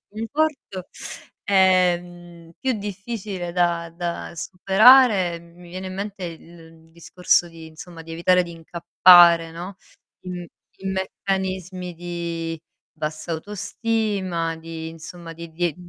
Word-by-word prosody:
conforto. 225 - -2 0.6
Ehm, 175 -3 +1
più 265 -1 +1
difficile 200 -2 -5
da 170 -1 0
da 170 0 -5
superare, 195 -1 +5
mi 170 +1 -16
viene 185 +1 -6
in 185 - -7
mente 200 -1 -5
il 165 -1 -12
discorso 175 +1 +1
di 165 -1 -12
insomma, 165 +1 -11
di 165 0 -10
evitare 180 +2 +3
di 170 - -9
incappare, 170 0 +5
no, 175 +4 -8 0.5
in 180 +1 -8
meccanismi 190 -1 -3
di 170 -1 -4 0.4
bassa 155 +1 -5
autostima, 200 -2 -2
di 160 0 -7
insomma, 165 +1 -10
di 170 0 -10
di 170 -1 -1
175 Hz, 110 wpm, -23 LUFS, 165-190 Hz, 0.6 s, superare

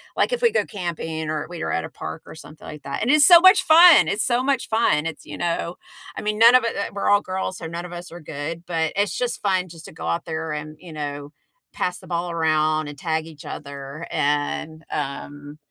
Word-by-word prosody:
Like, - - +1
if - - -1
we 470 - +5
go 465 - +1
camping 165 -4 -5
or 155 0 -3
we 175 -2 -6
were - - -2
at 85 - -1
a - - -8
park 80 0 -7
or - - -10
something 155 -1 -13
like 150 -1 -9
that. 140 - -5
And 235 - 0
it's 300 0 +6
so 345 -2 +9
much 375 +1 +6
fun! 335 0 +8
It's 210 +2 0
so 245 +1 +1
much 270 -2 0
fun. 220 -9 +2
It's 160 -2 -8
you 145 - -8
know? 170 0 -2 0.4
I - - -5
mean, 210 0 -2
none 230 +2 +7
of 255 -2 +6
it 230 - -2
uh, 200 - -3
we're 200 - -1
all 205 0 +5
girls, 185 0 -4
so 165 - -8
none 170 +2 -5
of 180 - -10
us 175 0 -8
are 175 - -9
good. 155 +2 -6
But 160 -2 -1
it's 200 0 0
just 245 -1 -2
fun 185 -2 0
just 165 -2 -12
to - - -10
go - - -8
out 85 0 -2
there 160 -1 -4
and, 150 0 -6
you 170 -1 -12
know, 145 -1 -6 0.4
pass 180 0 -2
the - - -13
ball 175 0 -2
around 155 -2 +1
and 145 - -9
tag 160 -1 -1
each 160 -3 -13
other. 140 +2 -8
And, 150 +2 -1
um, 145 +1 -6
165 Hz, 245 wpm, -22 LUFS, 150-200 Hz, 0.4 s, so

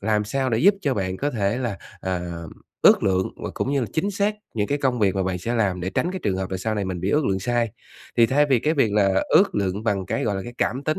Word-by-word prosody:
làm 105 0 +1
sao 130 +4 -1
để 110 - +1
giúp 195 +8 +5
cho 140 -6 0
bạn 95 -2 -2
có 145 +6 -1
thể 105 0 0
là, 115 -6 -3 0.2
à, 95 -1 -2 0.6
ước - - +6
lượng 95 -1 +1
và - - -3
cũng 135 - -1
như 140 - +2
là 120 - -1
chính 195 +6 0
xác 205 +2 0 0.2
những 105 -2 0
cái 145 - -1
công 130 -3 0
việc 100 -3 +2
mà 95 - 0
bạn 90 -1 -2
sẽ 115 +7 -3
làm 95 -6 0
để 95 +2 -3
tránh 175 - 0
cái 190 - -4
trường 95 -3 +1
hợp 95 -1 -3
là 95 - -2
sau 110 +3 -2
này 100 -2 -1
mình 95 -2 -4
bị 95 +3 -1
ước 150 -1 +2
lượng 95 -1 +1
sai. 120 +1 0 0.5
Thì 115 - +6
thay 145 +5 +3
vì 130 - +5
cái 155 +7 0
việc 115 -8 +2
là 100 -2 +3
ước 195 0 +4
lượng 100 0 -1
bằng 100 -4 0
cái, - - -1
gọi 105 -3 0
là, 95 - -3
cái 120 +3 -9
cảm 135 +3 -1
tính 155 - 0
110 Hz, 295 wpm, -23 LUFS, 95-135 Hz, 0.6 s, ước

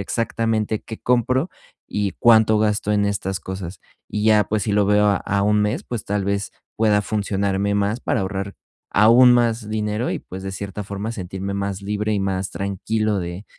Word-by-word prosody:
exactamente 110 0 -1
qué 110 - -8
compro, 125 +6 +1 0.4
y 105 -1 -1
cuánto 110 -2 +5
gasto 105 -1 0
en 105 -1 +2
estas 95 -2 -2
cosas. 95 -1 -7 0.3
Y 105 0 -2
ya, 105 -1 +5
pues 105 -2 -1
si 105 - -1
lo 100 -1 +3
veo 105 0 +4
a 100 - +3
a 100 0 -1
un 105 0 +3
mes, 120 - -1
pues 120 -4 -5
tal 100 -1 -1
vez, 100 0 -1 0.3
pueda 105 -2 +3
funcionarme 100 -1 -1
más 100 +4 0
para 120 - 0
ahorrar 100 0 -4 0.4
aún 120 +4 +7
más 115 -2 +1
dinero 105 +2 -1
y - - -2
pues, 95 +1 -9
de 95 - -4
cierta 100 +1 -5
forma, 100 +3 -4
sentirme 95 -1 -5
más 100 0 -3
libre 105 +1 -2
y 100 - 0
más 95 0 -2
tranquilo 105 +2 -1
de 85 +4 -6
105 Hz, 185 wpm, -21 LUFS, 100-110 Hz, 0.4 s, aún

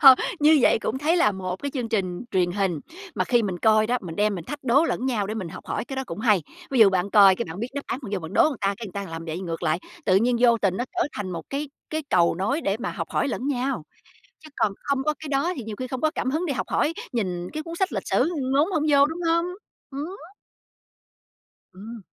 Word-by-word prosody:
Thôi, 270 -2 +11 0.3
như 305 +1 +6
vậy - - +4
cũng 240 +3 -2
thấy 310 +5 +2
là 210 -11 +4
một 185 -1 -4
cái 285 - -2
chương 245 -4 -2
trình 190 -3 -2
truyền 180 -3 +1
hình 190 -5 0 0.3
mà - - 0
khi 240 -2 +3
mình 190 -4 -2
coi 215 +2 +4
đó, 250 +2 +1
mình 165 -3 -8
đem 210 0 +2
mình 175 -4 -6
thách 290 +6 -7
đố 265 +5 +4
lẫn 260 -5 -1
nhau 220 -6 0
để 215 - -4
mình 195 -6 -4
học - - -10
hỏi, - - -2
cái 270 - -7
đó 265 - -1
cũng 170 - -6
hay. 210 -6 +3 0.3
Ví 265 - 0
dụ 205 -3 +8
bạn 190 +1 0
coi 195 -2 +7
cái 235 - -2
bạn 165 +2 -8
biết 235 - -2
đáp 285 - -3
án, - - -2
bạn 215 - -7
vô 200 - 0
bạn 160 -1 -8
đố - - +5
người 300 -3 +2
ta, 195 - +2
cái 225 - -7
người 190 - -11
ta 200 0 -4
làm 165 0 -6
vậy 165 +2 -4
ngược 170 -2 -5
lại, 155 0 +1 0.3
tự 185 - +4
nhiên 240 +4 +3
vô 235 -2 +5
tình 190 -3 +1
nó 245 - -1
trở 355 -1 +1
thành 200 -3 -4
một 170 -2 -4
cái 280 +1 -3 0.2
cái 315 0 -2
cầu 170 -1 +4
nối 210 - -1
để 195 -9 0
mà 245 - -3
học - - -5
hỏi - - 0
lẫn 260 - -3
nhau. 260 - -1 0.6
Chứ 310 - -14
còn 205 - +1
không 280 -1 0
có 305 +1 +1
cái 310 - -7
đó 285 +6 +1
thì 255 - -5
nhiều 215 -1 -6
khi 255 - -3
không 255 0 -5
có 310 - +2
cảm 255 - -1
hứng 320 +5 0
để 295 - -1
học - - -3
hỏi, 315 - +1 0.2
nhìn 180 -6 -2
cái 310 - -4
cuốn 335 +1 -7
sách 380 +2 0
lịch - - -3
sử - - +2 0.2
ngốn 295 +7 +3
hổng 315 -5 +1
vô, 280 -1 +6
đúng 320 +4 -4
hông? 335 +1 +2 0.5
Ừm. 295 +7 -5 1.6
Ừm. 215 +4 -9
235 Hz, 275 wpm, -25 LUFS, 190-280 Hz, 1.6 s, Thôi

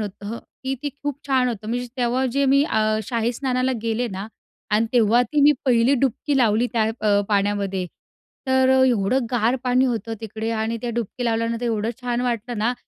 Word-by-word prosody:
होतं, 210 +2 -5 0.3
की 265 +1 -1
ते 290 - -1
खूप 290 -1 -3
छान 260 -2 +2
होतं 215 -2 -5
म्हणजे. 245 +1 -2
तेव्हा 250 +1 +1
जे 280 +2 +2
मी 275 +1 +4
अ, 215 -6 +1
शाही 235 -1 -1
स्नानाला 255 +1 0
गेले 230 +2 -1
ना 195 0 -6 0.4
आणि 215 +2 +2
तेव्हा 235 0 +4
ती 290 +5 0
मी 295 +1 +7
पहिली 245 +1 +4
डुबकी 275 +2 0
लावली 230 -1 +3
त्या 225 -2 +2 0.2
अ, 205 -1 +3
पाण्यामध्ये. 200 -2 0 0.6
तर 260 0 +3
अ, - - +5
एवढं 240 +2 +1
गार 240 0 +2
पाणी 255 +1 +3
होतं 225 -2 -2
तिकडे 220 +1 -4
आणि 225 0 -1
त्या 240 - -2
डुबकी 235 +2 -3
लावल्यानंतर 230 +1 -1
एवढं 225 -1 -1
छान 245 -1 -1
वाटलं 240 -2 -2
ना, 230 +3 +1
235 Hz, 185 wpm, -22 LUFS, 220-255 Hz, 0.6 s, मी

